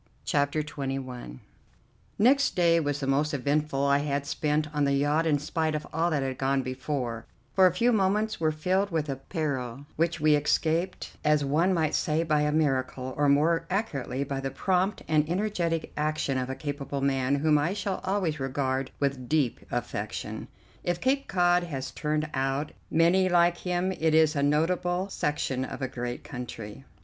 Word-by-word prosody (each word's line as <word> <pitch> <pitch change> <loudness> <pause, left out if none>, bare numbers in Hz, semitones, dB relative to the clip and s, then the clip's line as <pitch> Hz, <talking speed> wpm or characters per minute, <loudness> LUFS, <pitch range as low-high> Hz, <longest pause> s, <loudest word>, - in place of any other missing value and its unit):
CHAPTER 145 +1 +1
XXI 135 - -5 0.8
Next 270 +5 +4
day 170 -2 +4
was 145 -2 -1
the 140 - -3
most 145 +2 +1
eventful 140 0 0
I 140 0 +4
had 140 -1 -1
spent 150 +1 0
on 150 -1 +1
the 140 0 +2
yacht 145 +4 +2
in 150 -2 +3
spite 155 +2 -1
of 150 - -3
all 165 +2 +1
that 145 -4 0
had 130 -1 -3
gone 135 0 +1
before, 130 -3 -3 0.3
for 190 -1 +6
a - - +2
few 230 +8 +2
moments 210 +1 +1
were 155 -1 +2
filled 185 +6 0
with 160 -4 -1
a 135 - -2
peril 135 -4 -3
which 170 +1 +1
we 155 0 +4
escaped, 160 +4 0
as 150 -1 +3
one 160 +7 +2
might 160 -4 +1
say, 155 +2 +1
by 155 -2 +2
a 150 0 +1
miracle, 130 -4 0
or 145 -1 +2
more 165 +4 +3
accurately 145 - -2
by 140 -1 -3
the 135 0 -2
prompt 185 +7 0
and 155 0 +2
energetic 175 -4 -1
action 150 -2 -1
of 130 0 -2
a 130 - -3
capable 145 -1 -4
man 135 0 +1
whom 150 +1 +3
I 160 +6 0
shall 195 -1 -3
always 185 -6 -1
regard 135 0 -1
with 135 -3 -1
deep 150 -6 +1
affection. - - -4 0.4
If 175 0 -1
Cape 275 +4 +1
Cod 175 -1 +3
has 135 -5 -5
turned 155 0 -1
out 135 +2 -1 0.2
many 175 +4 +4
like 175 0 +4
him, 180 +1 -1
it 160 -3 +1
is 160 -1 +4
a 140 - +1
notable 175 +5 +1
section 145 -6 -1
of 130 - -6
a 135 - -1
great 120 -1 -5
country. 125 -2 -8
150 Hz, 180 wpm, -27 LUFS, 135-170 Hz, 0.8 s, for